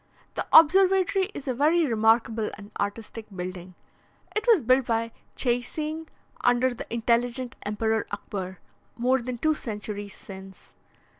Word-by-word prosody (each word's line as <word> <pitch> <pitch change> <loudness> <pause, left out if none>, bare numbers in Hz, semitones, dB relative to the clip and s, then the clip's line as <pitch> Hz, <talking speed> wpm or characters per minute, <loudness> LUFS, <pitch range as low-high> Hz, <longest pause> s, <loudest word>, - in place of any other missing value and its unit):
The - - -3
observatory 380 +3 +6
is 275 - -7
a 260 - +1
very 310 +6 +3
remarkable 225 -2 +2
and 205 +1 -12
artistic 215 +2 -4
building. 180 0 -6 0.6
It 430 - -1
was 440 - +5
built 255 +2 +3
by 230 -1 0 0.2
Dscheising, 300 +6 -1 0.4
under 245 +1 +3
the 240 - -9
intelligent 235 +2 0
Emperor 220 +1 -1
Akbar, 190 -2 -5 0.4
more 255 +2 +2
than 245 0 -4
two 310 +6 +2
centuries 205 -5 -6
since. 190 -1 -12
235 Hz, 130 wpm, -26 LUFS, 210-275 Hz, 0.6 s, observatory